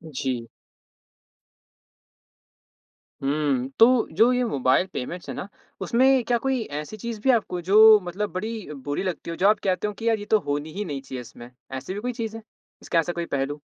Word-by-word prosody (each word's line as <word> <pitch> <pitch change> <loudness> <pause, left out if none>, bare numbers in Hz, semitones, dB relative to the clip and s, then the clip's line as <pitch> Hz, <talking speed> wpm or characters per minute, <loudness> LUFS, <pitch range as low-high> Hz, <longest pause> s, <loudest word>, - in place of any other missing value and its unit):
जी। 130 -4 -2 2.7
हुँ। 140 -2 0
तो 235 +1 +6
जो 220 +9 +4
ये 250 0 +1
मोबाइल 135 - +2
पेमेंट्स 170 +8 -5
है - - -4
ना 180 - -5 0.3
उसमें 260 +1 +3
क्या 240 0 +2
कोई 265 -2 +1 0.2
ऐसी 185 +8 -9
चीज़ 230 +1 -5
भी 265 - +1
आपको 200 -7 0
जो 215 +1 +9
मतलब 185 +3 -3
बड़ी 215 -3 -5
बुरी 145 +4 -4
लगती 185 -3 -4
हो, 165 - -3
जो 190 - +3
आप 210 0 +4
कहते 185 +1 0
हो 210 - -4
कि 225 +3 -5
यार 225 -1 +1
ये 205 - -7
तो - - +4
होनी 145 +2 -2
ही 205 +2 -3
नहीं 145 -5 -4
चाहिए 130 -2 -7
इसमें। 120 0 -12 0.2
ऐसी 130 +8 -5
भी 200 - -4
कोई 250 +3 -3
चीज़ 225 -2 -4
है? 225 - -11 0.4
इसका 165 - +1
ऐसा 170 +2 -1
कोई 170 0 -3
पहलू? 145 0 -3
185 Hz, 190 wpm, -24 LUFS, 145-225 Hz, 2.7 s, जो